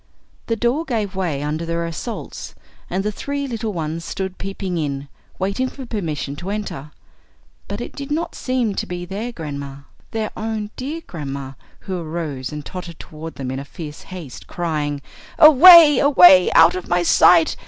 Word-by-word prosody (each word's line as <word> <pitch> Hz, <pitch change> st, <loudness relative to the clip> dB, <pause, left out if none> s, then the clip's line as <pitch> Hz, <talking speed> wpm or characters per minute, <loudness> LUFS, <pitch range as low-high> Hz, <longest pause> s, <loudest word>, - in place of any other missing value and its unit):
The 230 Hz, -, 0 dB
door 240 Hz, +8 st, 0 dB
gave 215 Hz, -, -3 dB
way 165 Hz, -7 st, -2 dB
under 155 Hz, +2 st, -2 dB
their 170 Hz, 0 st, -2 dB
assaults, 165 Hz, +8 st, -6 dB, 0.3 s
and 190 Hz, +2 st, -1 dB
the 210 Hz, -, -1 dB
three 280 Hz, +6 st, -4 dB
little 225 Hz, -3 st, -3 dB
ones 165 Hz, -2 st, -4 dB
stood 190 Hz, +2 st, -5 dB
peeping 195 Hz, -2 st, -4 dB
in, 140 Hz, -2 st, -3 dB, 0.3 s
waiting 200 Hz, +7 st, -1 dB
for 265 Hz, -1 st, -9 dB
permission 155 Hz, -, -4 dB
to 175 Hz, +4 st, -6 dB
enter. 200 Hz, -9 st, -5 dB, 0.8 s
But 205 Hz, +3 st, -5 dB
it -, -, -7 dB
did 280 Hz, 0 st, -7 dB
not 335 Hz, +3 st, -2 dB
seem 255 Hz, -5 st, -1 dB
to -, -, -3 dB
be 175 Hz, 0 st, -5 dB
their 205 Hz, +6 st, -5 dB
grandma 140 Hz, -7 st, -7 dB, 0.3 s
their 220 Hz, -1 st, -3 dB
own 215 Hz, -1 st, -4 dB
dear 295 Hz, +6 st, -5 dB
grandma 140 Hz, -4 st, -6 dB, 0.3 s
who 185 Hz, -2 st, -4 dB
arose 155 Hz, -6 st, -5 dB
and 150 Hz, -1 st, -7 dB
tottered 180 Hz, -3 st, -8 dB
toward 160 Hz, +1 st, -9 dB
them 130 Hz, -2 st, -5 dB
in 135 Hz, +1 st, -4 dB
fierce 150 Hz, +1 st, -9 dB
haste, 175 Hz, -8 st, -9 dB
crying: 150 Hz, -4 st, -3 dB, 0.3 s
"Away, 310 Hz, -1 st, +9 dB
away! 185 Hz, -10 st, +7 dB
Out 165 Hz, +1 st, +7 dB
of 185 Hz, -, -5 dB
my 175 Hz, 0 st, +1 dB
sight! 170 Hz, -1 st, +5 dB
180 Hz, 165 wpm, -20 LUFS, 155-225 Hz, 0.8 s, Away